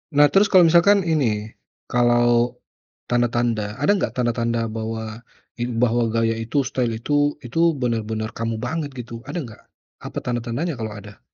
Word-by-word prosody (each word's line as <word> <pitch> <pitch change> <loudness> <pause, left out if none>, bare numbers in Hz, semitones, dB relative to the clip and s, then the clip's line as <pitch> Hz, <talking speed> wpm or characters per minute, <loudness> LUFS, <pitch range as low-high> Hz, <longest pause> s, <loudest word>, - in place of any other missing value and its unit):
Nah 145 0 +6
terus 200 +1 +5
kalau 185 -2 +6
misalkan 175 +4 +5
ini, 115 -10 0 0.4
kalau 120 0 +3 0.6
tanda-tanda. 120 -3 0
Ada 145 +8 +3
nggak - - -2
tanda-tanda 115 -2 0
bahwa, 110 +1 -5 0.4
in 120 -1 -2
bahwa 120 -1 +2
gaya 115 0 +1
itu, 115 +5 -1
style 120 -3 -1
itu 145 +3 +1
itu 165 +6 +1
benar-benar 110 -3 -2
kamu 115 0 -2
banget 145 +4 -3
gitu. 115 -1 -8
Ada 170 +4 -3
nggak? 110 -4 -11 0.4
Apa - - -7
tanda-tandanya, 120 +7 -2
kalau 110 -1 -4
ada? 100 0 -11
120 Hz, 150 wpm, -22 LUFS, 115-145 Hz, 0.6 s, Nah